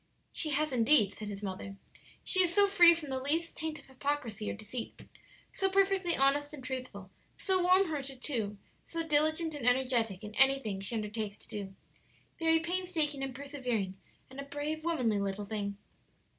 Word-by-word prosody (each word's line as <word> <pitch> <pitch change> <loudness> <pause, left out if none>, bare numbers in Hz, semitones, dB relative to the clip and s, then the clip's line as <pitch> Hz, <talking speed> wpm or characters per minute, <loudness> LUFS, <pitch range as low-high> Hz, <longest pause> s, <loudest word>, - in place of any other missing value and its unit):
"She 310 - -1
has 300 +1 +1
indeed," 230 -4 +4
said 215 - -8
his 200 0 -7
mother; 195 0 -5 0.5
"she 370 - +5
is 350 -2 +3
so 405 +2 +5
free 345 -4 +8
from 300 -4 -7
the 260 - -1
least 320 +5 -1
taint 315 -1 -4
of 285 - -14
hypocrisy 260 -6 -3
or - - -3
deceit; 220 +3 -7 0.5
so 385 - 0
perfectly 385 -2 +2
honest 290 +2 +2
and 265 - -11
truthful; 250 -7 -6 0.3
so 375 -2 +2
warm 370 +2 +5
hearted, 275 -5 -5
too; 220 -7 -3 0.3
so 330 0 -4
diligent 315 +1 +2
and 290 -4 -6
energetic 245 -6 +1
in 210 0 -8
anything 265 -6 +3
she 195 +4 -2
undertakes 210 -1 -3
to - - -14
do 195 -2 -6 0.6
very 325 0 +4
painstaking 330 -4 -1
and 265 -2 -4
persevering 250 -9 -3 0.3
and 265 +1 -11
a - - -4
brave, 290 +2 -4
womanly 250 -11 +1
little 200 +1 -2
thing." 200 -1 -4
275 Hz, 170 wpm, -31 LUFS, 215-320 Hz, 0.6 s, free